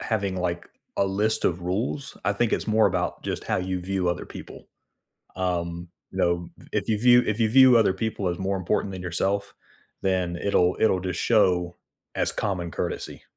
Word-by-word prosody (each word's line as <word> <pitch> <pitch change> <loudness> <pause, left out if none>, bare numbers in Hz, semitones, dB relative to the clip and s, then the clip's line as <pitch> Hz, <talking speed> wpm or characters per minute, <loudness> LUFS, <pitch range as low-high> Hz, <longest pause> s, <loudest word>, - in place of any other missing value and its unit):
having 100 -4 -1
like 85 -1 -3 0.3
a - - +3
list 105 +3 0
of 90 0 +1
rules, 110 +10 -3
I 105 - +2
think 115 +2 0
it's - - 0
more 110 0 +4
about - - -2
just - - -4
how - - 0
you 90 0 -2
view 95 0 -1
other 85 - -2
people, - - -11 0.7
um, 85 -2 -2 0.2
you - - -8
know, 85 0 +1 0.2
if - - -1
you 110 -2 +1
view 125 +1 +6
if 110 +1 -1
you 110 - +4
view 130 0 +7
other 110 -4 +4
people 100 -1 -2
as 85 - -3
more 95 +1 -1
important 95 +2 -1
than 95 -1 -6
yourself, 100 +3 -1 0.5
then 90 -2 0
it'll 90 -1 +2
it'll 95 -4 +3
just 90 -1 -3
show 90 -6 +2 0.4
as - - 0
common 90 -4 -2
courtesy, - - -4
95 Hz, 185 wpm, -25 LUFS, 90-110 Hz, 0.7 s, view